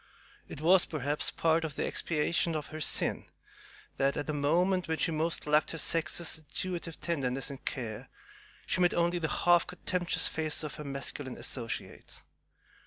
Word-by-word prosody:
It - - -8
was, 175 +3 +6
perhaps, 150 -1 0
part 165 0 +2
of 155 -3 -3
the - - -1
expiation 165 +1 0
of 150 -1 -4
her 155 - -5
sin - - +1 0.7
that, 135 +1 +2
at 150 - -2
a - - -3
moment 175 +6 +2
when 160 0 0
she 165 - +1
most 160 +2 0
lacked 150 +2 +3
her - - -4
sex's 165 0 -1
intuitive 170 +2 -4
tenderness 135 -4 -1
and 135 - -9
care, 120 -1 -4 0.6
she 185 - +1
met 175 - +4
only 175 +1 +2
the 160 - 0
half 175 +3 +3
contemptuous 180 -1 0
faces 155 -1 -1
of 150 - -4
her 150 - -6
masculine 140 -1 -4
associates. 115 -4 -6
155 Hz, 165 wpm, -31 LUFS, 145-170 Hz, 0.7 s, was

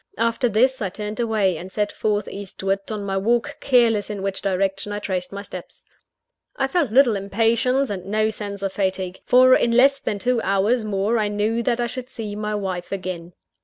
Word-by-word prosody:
After 230 +2 +1
this, 255 +5 +2
I 195 - -1
turned 210 +4 -6
away; 215 -6 +1
and 185 +2 -9
set 210 0 -1
forth 210 -1 -1
eastward 195 0 -3
on 210 -2 -3
my 195 -1 -2
walk, 235 +4 0
careless 235 -6 +3
in 205 -2 -5
which 195 -1 -3
direction 195 +1 -1
I 205 - -2
traced 185 -3 -3
my 200 0 -6
steps. 185 -3 -10 0.7
I 270 - +1
felt 310 -2 +1
little 245 -1 +5
impatience, 230 +6 +1
and 190 -2 -5
no 215 +2 +1
sense 200 -2 -5
of 195 -1 -2
fatigue; 190 -2 -2
for 255 +1 +7
in - - +2
less 270 +4 +4
than 205 - -2
two 245 +3 0
hours 205 +5 +1
more 210 +2 0
I 210 - +1
knew 210 +3 0
that 235 0 0
I 240 - +1
should 250 +1 -6
see 215 -5 -5
my 210 0 -2
wife 185 -3 -4
again. 180 -3 -5
210 Hz, 200 wpm, -22 LUFS, 195-235 Hz, 0.7 s, for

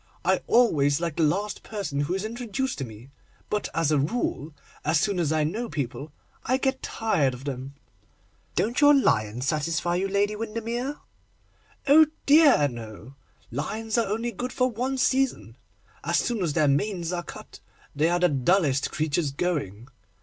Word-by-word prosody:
I - - +2
always 145 - +3
like 165 -3 -3
the - - +1
last 195 +7 0
person 200 -10 -4
who 145 +6 0
is 195 +2 -3
introduced 240 +2 -3
to - - -2
me; 115 +2 -11 0.4
but, 210 -1 -1
as 165 -2 +1
a 150 - +3
rule, 155 - -2 0.3
as 155 +1 +2
soon 200 0 0
as 160 -3 0
I 155 -1 +2
know 220 +10 -2
people 140 +1 -4 0.3
I 255 +2 +1
get 265 0 -1
tired 150 - 0
of 125 - -12
them.' 135 0 -5 0.8
'Don't 235 +6 0
your 290 0 +7
lions 115 - +1
satisfy 165 +4 0
you, 190 +2 0
Lady 200 +2 +1
Windermere?' 230 +5 -3 0.9
'Oh 305 +2 +7 0.2
dear, 285 - +6
no! 115 0 -9 0.4
lions 215 - -3
are 230 -1 +2
only 225 +4 -2
good 245 +4 -5
for 255 0 +1
one 255 +4 -2
season. 265 +1 0 0.5
As - - +1
soon 235 -5 0
as 165 -5 0
their 155 -2 +3
manes 175 +4 0
are 175 - -1
cut, - - -11 0.4
they 155 +3 +2
are 175 0 +1
the 180 - +4
dullest 140 0 +2
creatures 155 0 -1
going. 135 - -3
175 Hz, 165 wpm, -26 LUFS, 145-230 Hz, 0.9 s, your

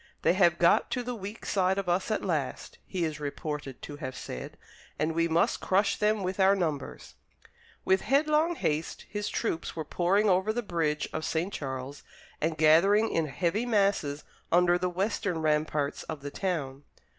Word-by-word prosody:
"They - - +4
have - - +4
got - - +4
to 250 - -2
the 250 +1 -3
weak 205 0 -7
side 190 -1 +1
of 195 -2 -2
us 175 +4 0
at 215 - -1
last," 155 -8 -3
he 180 -3 -1
is 155 -2 -4
reported 150 -2 -5
to 145 - -7
have 130 -3 -6
said, 65 - -7 0.4
"and 155 +1 0
we 165 +1 +2
must 170 +8 +2
crush 200 +1 +2
them 210 -1 +1
with 185 +1 -3
our 195 +1 +5
numbers." 155 -8 -3 0.7
With 190 0 +3
headlong 305 +4 +2
haste 155 - -2
his 210 0 -3
troops 170 -8 -2
were 160 -2 -4
pouring 195 +4 +2
over 190 +2 +3
the 240 +2 -2
bridge 160 -6 -1
of - - -3
St. 170 +6 -1
Charles, 135 0 -5 0.4
and 160 0 0
gathering 190 +8 +5
in 165 -2 0
heavy 185 - -1
masses 195 -10 +1 0.3
under 175 0 +4
the 180 - 0
western 195 0 -1
ramparts 150 -2 0
of 155 -3 -7
the 145 - -5
town. 145 -9 -3
175 Hz, 175 wpm, -29 LUFS, 150-200 Hz, 0.7 s, our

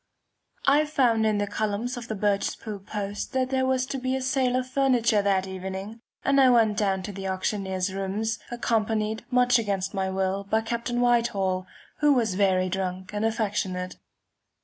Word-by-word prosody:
I 290 +2 +5
found 240 -7 +2
in 215 -1 +2
the 205 - +1
columns 215 +4 -2
of 240 -1 -7
the 220 - -3
Birchespool 205 0 -2
Post 205 +3 -4
that 260 0 0
there 260 -1 +1
was 260 0 +1
to 270 0 -4
be 255 +1 -1
a 265 - -2
sale 260 -1 +1
of 255 0 0
furniture 255 -5 +2
that 195 -2 +1
evening, 190 +4 -6 0.2
and 275 0 +4
I 260 - +7
went 225 -4 +4
down 195 -2 +1
to 205 - -5
the 195 0 -5
auctioneer's 190 0 -2
rooms, 205 +4 -2
accompanied, 220 -2 -1
much 245 -1 +4
against 195 -4 -2
my 190 -1 -1
will, 190 +1 -1
by 220 +3 +1
Captain 235 +1 -2
Whitehall, 200 -7 +1 0.3
who 295 -1 +5
was 230 -7 +1
very 185 -1 +2
drunk 185 +1 -3
and 210 +1 -1
affectionate. 205 -5 -1
215 Hz, 170 wpm, -26 LUFS, 195-245 Hz, 0.3 s, I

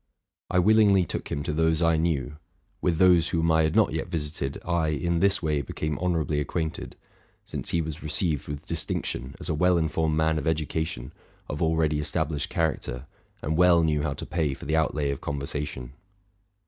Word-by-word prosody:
_ - - -52 0.5
I 90 - 0
willingly 100 -1 +5
took - - -5
him 70 - -2
to 75 - -2
those 80 +1 +2
I 80 0 +4
knew: 75 -4 -1 0.4
with 85 -3 +1
those 85 -2 +5
whom 85 -2 +1
I 80 0 +4
had 80 0 +1
not - - +4
yet - - -2
visited, 75 -3 -3
I 85 -2 +1
in 85 +3 0
this 100 0 +2
way 75 -2 +1
became 75 +3 -4
honorably 80 -5 0
acquainted; 80 +2 -3 0.5
since - - -4
he 85 -1 +1
was 80 +1 -6
received 75 -1 0
with 75 -1 -6
distinction 65 +2 -3
as - - -5
a - - 0
well 90 +3 +3
informed 80 -1 0
man 80 0 +2
of - - -6
educa 80 0 0
tion, 65 -2 -7 0.3
of 75 - -5
already 80 -2 +2
established 75 +2 -1
character, 75 -7 -2 0.4
and 80 +2 -1
well 90 -1 +5
knew 75 -2 +1
how 75 -2 -2
to - - -6
pay 80 -5 -1
for - - -11
the 80 +3 0
outlay 75 -2 +1
of 70 - -5
conversation. 70 -3 -4
80 Hz, 190 wpm, -26 LUFS, 75-85 Hz, 0.5 s, willingly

